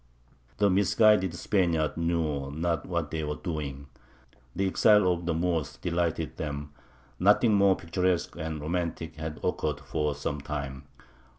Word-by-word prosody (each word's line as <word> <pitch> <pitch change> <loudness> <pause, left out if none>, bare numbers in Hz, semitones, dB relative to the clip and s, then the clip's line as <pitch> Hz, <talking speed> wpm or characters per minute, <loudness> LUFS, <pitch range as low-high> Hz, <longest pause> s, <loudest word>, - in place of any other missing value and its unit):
The 100 -2 +3
misguided 100 -1 +4
Spaniards 85 -6 +1
knew 80 -5 -1
not 80 +2 -2
what 85 -4 -2
they 80 -1 -2
were 75 0 -2
doing. 75 -6 -5 0.7
The 100 - 0
exile 105 0 +5
of 85 -1 -3
the 85 - +1
Moors 80 -4 -1
delighted 85 -2 -1
them; 75 -1 -4 0.5
nothing 105 +4 +5
more 100 -1 +5
picturesque 90 0 -1
and 80 -2 -4
romantic 80 0 -3
had 80 -1 -5
occurred 75 -1 -1
for 75 +1 -2
some 75 0 -3
time. 70 -2 -5
80 Hz, 135 wpm, -28 LUFS, 75-90 Hz, 0.7 s, exile